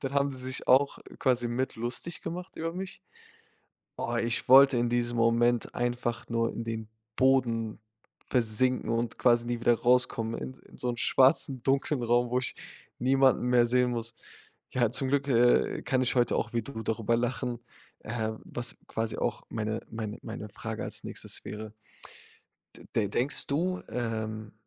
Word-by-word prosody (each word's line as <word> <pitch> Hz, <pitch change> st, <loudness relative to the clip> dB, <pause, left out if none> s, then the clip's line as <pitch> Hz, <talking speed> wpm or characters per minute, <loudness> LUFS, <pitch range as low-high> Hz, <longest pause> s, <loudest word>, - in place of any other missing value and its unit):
dann 135 Hz, -1 st, -4 dB
haben 140 Hz, 0 st, +2 dB
sie 130 Hz, -1 st, -7 dB
sich 130 Hz, 0 st, -3 dB
auch 140 Hz, +2 st, +4 dB, 0.2 s
quasi 125 Hz, -2 st, +2 dB
mit 130 Hz, +3 st, -2 dB
lustig 120 Hz, +9 st, -3 dB
gemacht 180 Hz, +2 st, -6 dB
über 165 Hz, +1 st, -3 dB
mich. 185 Hz, +1 st, -6 dB, 1.0 s
Oh, 120 Hz, -, -2 dB
ich 115 Hz, 0 st, -1 dB
wollte 135 Hz, 0 st, +8 dB
in 120 Hz, 0 st, +1 dB
diesem 120 Hz, 0 st, 0 dB
Moment 115 Hz, +1 st, +2 dB
einfach 120 Hz, -1 st, -2 dB
nur 115 Hz, 0 st, 0 dB
in 115 Hz, -, -5 dB
den 110 Hz, -1 st, -4 dB, 0.3 s
Boden 115 Hz, -5 st, +2 dB, 0.5 s
versinken 125 Hz, +1 st, +1 dB
und 115 Hz, 0 st, -1 dB
quasi 120 Hz, -1 st, +3 dB
nie 120 Hz, -1 st, -2 dB
wieder 120 Hz, 0 st, +4 dB
rauskommen 120 Hz, -2 st, +2 dB
in 130 Hz, -, -6 dB, 0.2 s
in -, -, -14 dB
so 125 Hz, -, -2 dB
'n 120 Hz, -, -1 dB
schwarzen, 130 Hz, +1 st, +3 dB
dunklen 135 Hz, 0 st, +1 dB
Raum, 120 Hz, +1 st, +2 dB
wo 125 Hz, -, +2 dB
ich 125 Hz, -, -2 dB, 0.4 s
niemanden 130 Hz, 0 st, +3 dB
mehr 120 Hz, -1 st, +4 dB
sehen 125 Hz, +1 st, +2 dB
muss. 115 Hz, -1 st, -3 dB, 0.6 s
Ja, 120 Hz, -3 st, +2 dB
zum 130 Hz, +2 st, -1 dB
Glück, 140 Hz, +1 st, +1 dB
äh, 120 Hz, -1 st, +3 dB
kann 130 Hz, -2 st, +1 dB
ich 125 Hz, -, +1 dB
heute 120 Hz, -2 st, +2 dB
auch 115 Hz, -, -2 dB
wie 115 Hz, -2 st, 0 dB
du 110 Hz, -2 st, -7 dB
darüber 115 Hz, +1 st, 0 dB
lachen, 120 Hz, 0 st, -2 dB, 0.5 s
ähm, 110 Hz, 0 st, -3 dB
was 120 Hz, -, -3 dB
quasi 110 Hz, 0 st, -3 dB
auch -, -, -2 dB
meine 110 Hz, 0 st, -3 dB
meine 110 Hz, 0 st, -5 dB
meine 110 Hz, -1 st, -7 dB
Frage 110 Hz, +2 st, -6 dB
als -, -, -3 dB
Nächstes -, -, -4 dB
wäre. 105 Hz, 0 st, -7 dB, 1.0 s
De -, -, -14 dB
de 105 Hz, -3 st, +1 dB
denkst 130 Hz, +8 st, +3 dB
du, 180 Hz, +6 st, -1 dB
ähm, 110 Hz, -2 st, -4 dB
120 Hz, 170 wpm, -29 LUFS, 115-130 Hz, 1.0 s, wollte